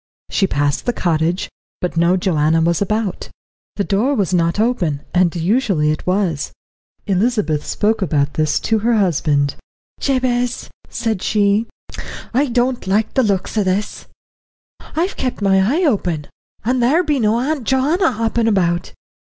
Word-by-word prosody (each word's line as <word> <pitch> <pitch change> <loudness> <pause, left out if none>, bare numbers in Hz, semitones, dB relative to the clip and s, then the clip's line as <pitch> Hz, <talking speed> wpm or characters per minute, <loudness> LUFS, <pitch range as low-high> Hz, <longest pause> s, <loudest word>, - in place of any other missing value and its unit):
She 195 - +2
passed 145 - -1
the 245 - +2
cottage, 170 -1 0 0.3
but 180 -2 -3
no 170 +2 +3
Joanna 160 -3 +2
was 170 +2 +1
about. 210 -1 -2 0.5
The 200 - 0
door 220 +9 +1
was 195 -5 0
not 170 +2 +1
open, 185 - 0
and 180 -1 +2
usually 175 -4 +1
it 155 - -5
was. 180 -6 0 0.5
Elizabeth 195 -6 0
spoke 220 +1 0
about 145 -5 0
this 155 -1 +1
to 220 -1 +1
her 230 +2 +2
husband. 145 -7 +1 0.4
"Jabez," 250 -2 -1 0.2
said 225 -5 -2
she, 210 +1 +2 0.7
"I 280 +4 +2
don't 245 -2 0
like 210 +3 +1
the 265 - +3
looks 200 -4 -1
o' - - +2
this; 190 +2 -2 0.9
I've 350 +5 -1
kept 255 -2 -2
my 195 -2 +3
eye 275 - +1
open, 180 - 0 0.4
and 250 +2 +1
there 295 +9 +3
be 300 -4 0
no 220 0 +2
Auntie 275 0 -2
Joanna 285 - +2
hoppin' 230 +1 0
about. 175 -5 +1
200 Hz, 150 wpm, -18 LUFS, 170-240 Hz, 0.9 s, no